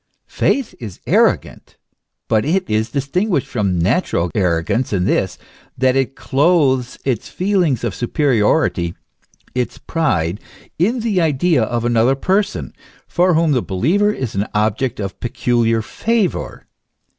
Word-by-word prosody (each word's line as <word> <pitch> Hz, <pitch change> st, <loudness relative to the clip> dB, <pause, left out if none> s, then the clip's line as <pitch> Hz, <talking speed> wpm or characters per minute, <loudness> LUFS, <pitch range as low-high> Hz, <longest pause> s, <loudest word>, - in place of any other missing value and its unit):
Faith 275 Hz, -5 st, 0 dB
is 110 Hz, -7 st, -8 dB
arrogant, -, -, +1 dB, 0.5 s
but 110 Hz, -1 st, +2 dB
it 185 Hz, +5 st, 0 dB
is 110 Hz, +1 st, 0 dB
distin 140 Hz, -, -1 dB
guished 175 Hz, -, +1 dB
from 100 Hz, -6 st, -1 dB
natural 90 Hz, -, +1 dB
arrogance 90 Hz, +6 st, 0 dB
in 95 Hz, -3 st, 0 dB
this, -, -, 0 dB, 0.4 s
that 130 Hz, 0 st, +2 dB
it 135 Hz, 0 st, 0 dB
clothes 135 Hz, -4 st, +1 dB
its 125 Hz, -5 st, -1 dB
feel 195 Hz, +1 st, 0 dB
ing 150 Hz, -8 st, +2 dB
of 120 Hz, -, -1 dB
superiority, 120 Hz, -, +1 dB, 0.6 s
its 125 Hz, -1 st, -2 dB
pride, 100 Hz, -, -1 dB, 0.4 s
in 225 Hz, +8 st, +1 dB
the 210 Hz, -5 st, +1 dB
idea 160 Hz, -1 st, +2 dB
of 120 Hz, +1 st, -1 dB
another 120 Hz, +2 st, +3 dB
person, 200 Hz, +8 st, -1 dB, 0.3 s
for 180 Hz, 0 st, +2 dB
whom 165 Hz, -1 st, +3 dB
the 130 Hz, -4 st, +2 dB
believer 165 Hz, -, +1 dB
is 130 Hz, -, -4 dB
an 100 Hz, +2 st, -1 dB
object 110 Hz, +4 st, 0 dB
of 100 Hz, -2 st, -5 dB
peculiar 120 Hz, -1 st, 0 dB
favour. 220 Hz, -, -2 dB
130 Hz, 135 wpm, -18 LUFS, 110-170 Hz, 0.6 s, another